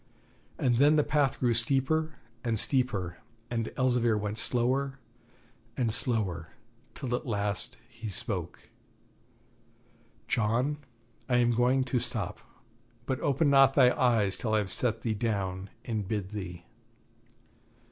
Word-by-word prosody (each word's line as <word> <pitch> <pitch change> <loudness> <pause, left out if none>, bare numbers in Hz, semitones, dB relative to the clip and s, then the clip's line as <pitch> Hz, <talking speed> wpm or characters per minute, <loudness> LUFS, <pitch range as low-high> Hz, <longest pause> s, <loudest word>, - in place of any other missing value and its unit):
And 120 -3 +2
then 145 +4 +5
the 150 - +4
path 145 -3 +1
grew 120 -2 +2
steeper 140 +7 +1 0.3
and 115 -2 0
steeper, 105 -9 +1 0.3
and 115 -2 -2
Elzevir 120 -3 +2
went 105 +1 -3
slower 130 +4 0 0.8
and 120 -4 +1
slower, 95 -11 -1 0.4
till 130 -4 -4
at 125 - -2
last 100 -3 -1
he 115 -2 -8
spoke: 90 -3 -2 1.6
'John, 120 +7 +1 0.5
I 125 - +3
am 120 0 +3
going 125 +3 +2
to 130 -1 0
stop; 120 - -2 0.7
but 130 -1 -2
open 145 +1 +2
not 135 -1 +6
thy 125 0 +5
eyes 110 -6 +2
till 110 -3 0
I - - +4
have 100 -3 -1
set 115 +2 -1
thee 115 - -1
down 100 -4 -2 0.2
and 110 -5 -3
bid 100 -2 -3
thee.' 90 -4 -7
120 Hz, 130 wpm, -29 LUFS, 105-130 Hz, 1.6 s, not